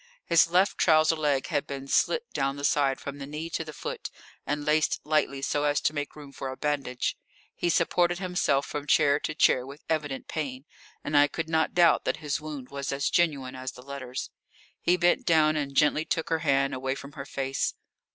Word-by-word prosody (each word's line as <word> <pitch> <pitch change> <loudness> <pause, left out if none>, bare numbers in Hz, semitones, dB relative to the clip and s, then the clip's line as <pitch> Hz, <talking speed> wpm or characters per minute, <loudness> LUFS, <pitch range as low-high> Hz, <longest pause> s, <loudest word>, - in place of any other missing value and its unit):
His 165 0 +5
left 185 +3 +2
trouser 155 -1 +4
leg 145 -4 0
had 145 - -1
been 135 -1 -6
slit 475 - +2
down 135 0 0
the 140 - -8
side 140 -2 +2
from 140 0 -7
the 140 - -6
knee 155 +3 -6
to 160 - -2
the 155 - -8
foot - - -6 0.4
and 145 0 -2
laced 155 +1 +2
lightly 150 -3 0
so 145 +1 0
as 145 0 +2
to - - +1
make 145 -1 -4
room 145 -2 -11
for 135 0 -6
a 130 - -6
bandage. 140 -4 -1 0.4
He 175 - -1
supported 175 +1 +2
himself 180 -7 0
from 145 0 -5
chair 145 -2 +4
to 155 - -4
chair 130 -4 +4
with 140 +3 -11
evident 145 -4 -2
pain, 135 -4 -4 0.4
and 145 - -3
I 145 0 +7
could 160 +2 -4
not 160 +1 +1
doubt 170 -2 +5
that - - 0
his 150 -2 -3
wound 150 -4 -7
was 140 -1 -4
as 140 0 -1
genuine 140 -7 +1
as 130 0 -5
the 125 - -13
letters. 135 -2 -6 0.5
He 180 +1 +3
bent 175 0 +3
down 155 -2 +4
and 140 -2 -3
gently 150 +1 +3
took 160 0 -2
her 165 -1 +1
hand 140 -3 +2
away 130 +1 -2
from 140 0 -9
her 140 -1 -8
face. 135 0 -2
145 Hz, 210 wpm, -27 LUFS, 135-155 Hz, 0.5 s, I